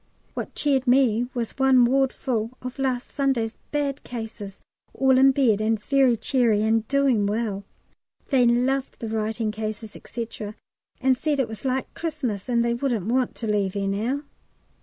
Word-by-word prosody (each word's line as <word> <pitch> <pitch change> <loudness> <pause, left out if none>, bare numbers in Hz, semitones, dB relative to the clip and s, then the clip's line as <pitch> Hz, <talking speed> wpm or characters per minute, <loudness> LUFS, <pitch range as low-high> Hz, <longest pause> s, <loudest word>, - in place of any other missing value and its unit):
What - - -6
cheered 275 -3 +1
me 245 -2 +3
was 240 +2 -4
one 265 -2 +5
ward 265 +1 +2
full 235 -1 -3
of 255 +2 -6
last 260 -2 -1
Sunday's 255 -6 -1
bad 285 -1 -2
cases, 225 -4 -7 0.4
all 265 -1 +4
in 270 +1 +7
bed, 245 -6 +2
and 220 0 +1
very 260 +1 +3
cheery 225 -2 +2
and 220 0 +1
doing 270 -7 +2
well. 205 -2 -2 0.6
They 255 -4 +4
loved 255 +3 +1
the 225 - -5
writing 220 0 -1
cases, 215 0 -5
&c., 235 -2 -4 0.7
and 260 0 +4
said 295 +2 -1
it 265 - +1
was 220 +2 -9
like 260 0 0
Xmas, 265 - -3
and 235 -1 +2
they 235 - +1
wouldn't 235 -6 -1
want 250 +2 0
to 230 - -5
leave 205 -2 0
'ere 200 -1 -1
now. 230 +9 -1
240 Hz, 165 wpm, -24 LUFS, 220-265 Hz, 0.7 s, in